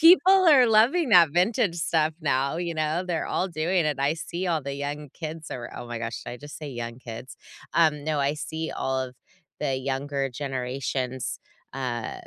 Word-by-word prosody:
People 335 +3 +9 0.3
are 270 -5 +7
loving 235 +8 +4
that 175 -6 +7
vintage 180 -1 +2
stuff 160 -2 +1
now, 140 0 +1
you 170 -1 -2
know? 155 +3 0
They're 170 -2 -1
all 185 - 0
doing 170 +1 +1
it, 150 -2 0
I 140 +3 +2
see 175 +3 -4
all 160 -4 0
the 140 0 -4
young 145 +1 -4
kids 160 0 -7
are 120 -1 -5
oh 120 - -7
my 120 -1 -4
gosh, 115 -1 -4
did - - -6
I - - -6
just 145 +2 -9
say 150 -2 -6
young 120 -1 -5
kids? 120 +1 -9 0.4
Um, 155 -3 +3
no, 155 -1 0
I 140 +2 +1
see 160 +1 -4
all 130 0 -1
of 130 -1 -5 0.4
the 135 - 0
younger 135 +1 -2
generations, 130 -1 -3 0.3
uh 125 -4 -3
150 Hz, 190 wpm, -26 LUFS, 130-170 Hz, 0.4 s, People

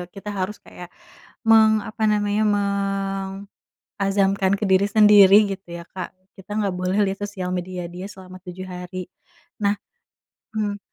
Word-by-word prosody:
kita 205 +2 -8
harus 200 +1 -3
kayak 180 - -11 0.6
meng 220 -1 +5
apa 220 0 -1
namanya 205 0 +1
meng 195 -1 -1 0.6
azamkan 195 0 +2
ke 200 +1 -1
diri 190 +1 +4
sendiri 205 -1 +7
gitu 180 -3 -13
ya 170 0 -7
Kak 185 -1 -7 0.2
kita 190 +2 -9
nggak 205 -3 -1
boleh 185 +2 -1
lihat 195 0 -2
sosial 190 -3 -5
media 180 -1 -4
dia 180 +2 -8
selama 185 -2 -11
7 185 +1 -7
hari. 180 0 -7 0.5
Nah, 200 0 +3 0.8
mmm, 205 -2 -2
195 Hz, 145 wpm, -22 LUFS, 185-205 Hz, 0.8 s, sendiri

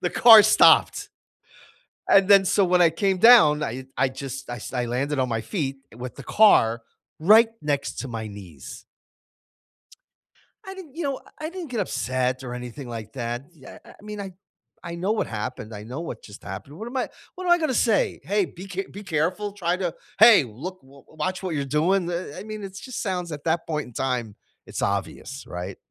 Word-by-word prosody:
the 175 - -1
car 225 -3 +9
stopped. 215 +1 +5 1.0
And, 195 -1 +6
then 200 -1 +7
so 195 +1 +3
when 180 0 +3
I 170 - +5
came 190 +3 0
down, 160 -10 +7
I 130 0 -4
I 135 - +3
just 135 0 -7
I 120 - -4
s 105 - -8
I 125 -2 -1
landed 135 +4 -2
on 130 - +1
my 115 -2 -2
feet 135 - -3 0.2
with 125 +1 -7
the 140 - -10 0.2
car 115 - +6 0.4
right 220 +7 +6
next 145 -2 -2
to 130 - -5
my 115 -2 -5
knees. 95 -9 -11 1.8
I 385 - -7
didn't, 360 -8 -12
you 340 - -4
know, 275 -2 -3 0.2
I 310 +1 -4
didn't 355 -4 -8
get 240 -3 -3
upset 130 - -1
or 125 - -6
anything 125 +2 -8
like 110 -2 -7
that. 120 0 -4
Yeah, 135 -6 -13
eh, - - -15
I - - -18
mean, 210 0 -7
I 195 -2 -6 0.5
I 170 -1 -6
know 185 +4 -1
what 220 - -1
happened, 115 +1 -6
I 105 0 -8
know 125 +8 -6
what 125 -9 -7
just 105 - -13
happened, 105 +10 -8
what 220 +3 -7
am 260 - -5
I 255 - -1 0.3
what 370 - -7
am 350 - +2
I 345 - +7
gonna 310 -6 -1
say? 230 -3 +1
"Hey. 200 +5 +1
Be 185 +3 -11
ca 190 +1 -4
be 205 - -9
careful. 185 +4 -1
Try 180 -3 -1
to 180 -3 -2 0.3
Hey! 220 -7 +8
Look, 160 - -8
w 135 0 -18
watch 185 +4 -4
what 175 -4 -3
you're 140 - -2
doing." 170 +6 +1
Eh - - -3 0.2
eh - - -7
I - - -8
mean, 215 -1 -7
it 195 -1 -8
just 255 -3 -6
sounds, 180 -5 -3
at 150 -1 -7
that 165 0 0
point 150 -4 -3
in 120 - -15
time 125 -5 -2 0.3
it's - - -6
obvious, 100 +7 -3
right? 90 +2 -6
155 Hz, 210 wpm, -24 LUFS, 125-200 Hz, 1.8 s, car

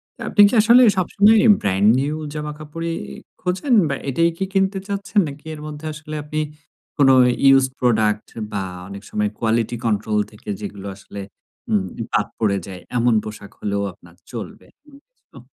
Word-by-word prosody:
তো - - -15
আপনি 205 - +5
কি - - -7
আসলে 240 +3 +6 0.2
সবসময় 205 +4 +4 0.2
brand 100 +1 +2
new 150 +2 -1 0.2
জামাকাপড়ই 155 +2 -5 0.4
খোঁজেন, 185 +8 -1 0.2
বা 140 - 0
এটাই 165 +5 +2
কি 190 - -1
কিনতে 195 0 +1
চাচ্ছেন? 200 +1 -1
নাকি 145 +2 -10
এর 150 - -8
মধ্যে 150 +1 -8
আসলে 150 0 -8
আপনি 155 +1 -3 0.6
কোনো 135 -3 +6 0.4
used 130 -1 +3
product 110 -3 +2 0.2
বা 100 -2 -2 0.2
অনেক 100 +1 -9
সময় 105 -1 0
quality 115 +1 0
control 105 -1 0
থেকে 105 0 -12
যেগুলো 100 -1 -7
আসলে 100 0 -9 0.5
উম 100 -3 +2 0.3
বাদ - - +1
পড়ে 100 -3 +2
যায় 90 -2 -8 0.2
এমন 120 0 +3
পোশাক 105 -2 -9
হলেও 100 -1 -2
আপনার 85 0 -19 0.2
চলবে? 110 -6 -8 0.2
উম 280 - -16 0.3
হুম। - - -14
130 Hz, 160 wpm, -21 LUFS, 105-165 Hz, 0.6 s, আসলে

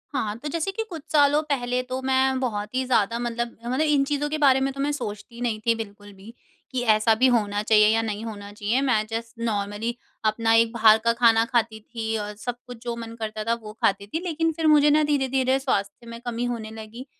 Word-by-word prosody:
हाँ, 215 -4 -1
तो 295 - -7
जैसे 335 +5 -2
कि 445 +3 -3
कुछ 325 -4 -7
सालों 295 0 +4
पहले 250 -2 0
तो 255 +1 -4
मैं 265 0 +2
बहुत 215 -3 -3
ही 260 - +1
ज़्यादा 230 -2 +1
मतलब 235 0 -3
मतलब 255 +5 -1
इन 295 -3 +3
चीज़ों 290 0 -1
के 310 - -2
बारे 270 -3 +4
में 270 0 0
तो 275 - -10
मैं 290 +1 0
सोचती 215 -3 -6
नहीं 225 -3 -1
थी 230 - +4
बिल्कुल 205 -2 -8
भी। 200 +4 -13 0.4
कि 255 -1 -1
ऐसा 215 +1 +4
भी 255 +3 +4
होना 210 -4 +1
चाहिए 210 -1 +5
या 225 - +2
नहीं 215 -1 -4
होना 205 -2 -7
चाहिए 210 +5 -1
मैं 225 -6 +1
जस्ट 230 +1 -5
नॉर्मली 215 +1 -2 0.3
अपना 225 +1 +2
एक 225 0 +4
बाहर 220 -1 +6
का 230 - +4
खाना 230 -1 +4
खाती 230 -3 0
थी 225 0 -4
और 210 0 -4
सब 240 +3 -5
कुछ 245 -1 -8
जो 235 -1 -3
मन 230 -1 -7
करता 215 -1 -4
था 230 +1 +1
वो 210 0 -8
खाती 200 0 +1
थी। 320 - -3
लेकिन 325 -1 0
फिर 320 0 -1
मुझे 295 -1 +6
ना 305 +1 +4
धीरे-धीरे 265 -2 +1
स्वास्थ्य 230 -3 -2
में 230 0 -8
कमी 240 0 -2
होने 225 -3 -4
लगी, 225 +3 -9
235 Hz, 225 wpm, -24 LUFS, 215-265 Hz, 0.4 s, बाहर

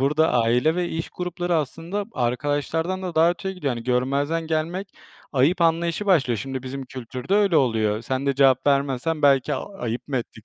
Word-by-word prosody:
burada 150 +4 +2
aile 125 +6 +3
ve 175 0 -1
iş 165 0 -4
grupları 180 0 -3
aslında 165 +7 -3
arkadaşlardan 145 +8 -1
da 180 -2 -4
daha 165 +2 +5
öteye 190 +2 -4
gidiyor. 150 -7 -2
Hani 115 -1 -7
görmezden 140 +6 0
gelmek 165 +5 -2 0.4
ayıp 150 +7 +2
anlayışı 170 +4 +1
başlıyor. 135 - +3
Şimdi 130 +3 -5
bizim 135 +1 -6
kültürde 130 - -4
öyle 200 -5 +3
oluyor. 110 -5 +1
Sen 130 +3 -2
de 140 - +2
cevap 130 -1 +4
vermezsen 140 +2 +1
belki 140 0 +4
"A, 195 +8 -7
ayıp 120 +3 -4
mı 135 - -1
ettik 115 -2 -6
145 Hz, 180 wpm, -23 LUFS, 130-170 Hz, 0.4 s, daha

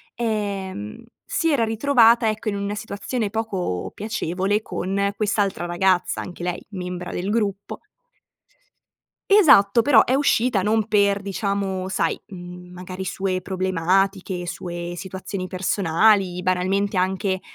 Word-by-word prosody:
ehm, 200 - -3 0.2
si 330 -1 0
era 255 -6 +2
ritrovata, 230 0 +4
ecco, 215 +1 -3
in 200 - -3
una 200 +1 -3
situazione 215 +1 -3
poco 195 - -3
piacevole 205 -1 -1
con 200 +2 -2
quest'altra 205 -5 0
ragazza, 180 +1 +1
anche 175 -1 -9
lei 180 -1 -3
membra 180 -1 -5
del 185 +3 -3
gruppo. 205 -3 -2 1.5
Esatto, 235 - +6
però 230 -2 +5
è 255 - -1
uscita 250 -6 +2
non 215 +2 +1
per 200 -1 +2
diciamo, 195 -1 -2
sai, - - 0
mhmm, 180 -2 -10
magari 185 +1 -7
sue 185 -1 -2
problematiche, 185 0 0
sue 175 -1 -5
situazioni 190 +1 -5
personali, 185 0 +2
banalmente 185 +2 0
anche, 190 +1 0
195 Hz, 120 wpm, -22 LUFS, 185-215 Hz, 1.5 s, Esatto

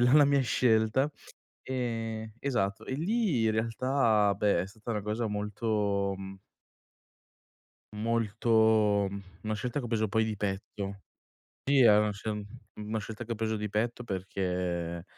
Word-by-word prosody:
la 125 +1 +4
la 145 - +7
mia 140 0 +3
scelta, 120 +2 +2 0.6
ehm, 115 -4 -3
esatto, 115 -7 -1
e - - -4
lì 180 - +1
in 110 - +3
realtà, 115 -2 +2
beh, 100 -4 +2
è 95 - -5
stata 110 +3 -11
una 105 -2 -1
cosa 110 +3 -2
molto, 105 -1 -1
mhmm 95 0 -8 1.6
molto, 110 -2 +3 0.4
una 110 0 -1
scelta 125 +6 -2
che 125 - -4
ho - - -4
preso 110 -2 0
poi 110 +1 +2
di 110 -1 -2
petto. 100 0 -4 0.6
Sì, 140 0 +3
è 110 -5 +7
una 105 0 +2
sce 105 0 -4 0.3
una 105 +1 -3
scelta 110 +3 -6
che 115 - -6
ho - - 0
preso 110 0 -1
di 105 0 -3
petto 115 +4 -1
perché, 90 -4 -2
110 Hz, 150 wpm, -30 LUFS, 100-115 Hz, 1.6 s, la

